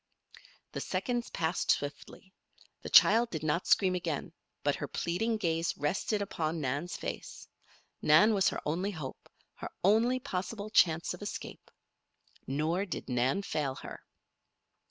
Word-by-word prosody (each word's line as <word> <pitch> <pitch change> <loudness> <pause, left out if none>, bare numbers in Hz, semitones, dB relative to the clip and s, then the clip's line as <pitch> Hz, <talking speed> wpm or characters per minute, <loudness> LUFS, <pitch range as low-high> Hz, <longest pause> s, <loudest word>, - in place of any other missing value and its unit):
The - - -4
seconds 240 -1 -2
passed 165 +2 -2
swiftly. 145 +7 -2 0.5
The - - -6
child 230 +1 +7
did 160 -6 -5
not 155 +3 0
scream 185 -2 +4
again, 170 -3 -3 0.3
but 145 -1 +1
her 145 - -4
pleading 220 - -1
gaze 165 -4 -1
rested 195 +7 0
upon 165 -4 -2
Nan's 145 +5 -2
face. - - -6 0.5
Nan 205 +9 +6
was 195 -2 +3
her - - -4
only 175 +6 -1
hope 155 -9 -7 0.2
her - - -7
only 225 +6 +4
possible 210 -3 -4
chance 165 -5 +3
of - - -10
escape. - - -7 0.8
Nor 160 +8 0
did 170 - -5
Nan 130 +10 +1
fail 145 -7 -2
her. - - -9
175 Hz, 135 wpm, -31 LUFS, 150-205 Hz, 0.8 s, child